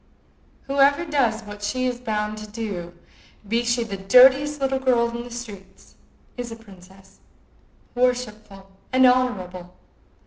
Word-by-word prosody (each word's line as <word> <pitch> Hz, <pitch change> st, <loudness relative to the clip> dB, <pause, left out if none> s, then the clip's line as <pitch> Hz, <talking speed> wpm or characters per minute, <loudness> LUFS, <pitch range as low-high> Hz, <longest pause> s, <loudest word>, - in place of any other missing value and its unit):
Whoever 280 Hz, +3 st, +2 dB
does 245 Hz, -8 st, 0 dB
what 205 Hz, 0 st, -10 dB
she 255 Hz, +5 st, -2 dB
is 250 Hz, -1 st, -2 dB
bound 215 Hz, -2 st, -3 dB
to 215 Hz, -, -9 dB
do, 200 Hz, -6 st, -6 dB, 0.5 s
be 230 Hz, +3 st, 0 dB
she 240 Hz, 0 st, 0 dB
the 200 Hz, -4 st, -6 dB
dirtiest 265 Hz, +8 st, +5 dB
little 270 Hz, -1 st, 0 dB
girl 245 Hz, -3 st, +2 dB
in 235 Hz, -, -4 dB
the 245 Hz, -, -10 dB
street, 210 Hz, -6 st, -11 dB, 0.4 s
is 245 Hz, -1 st, -5 dB
a -, -, -6 dB
princess, 190 Hz, -3 st, -18 dB, 0.7 s
worshipful, 215 Hz, -6 st, -2 dB, 0.2 s
honorable. 245 Hz, -9 st, +1 dB
235 Hz, 130 wpm, -23 LUFS, 200-255 Hz, 0.7 s, dirtiest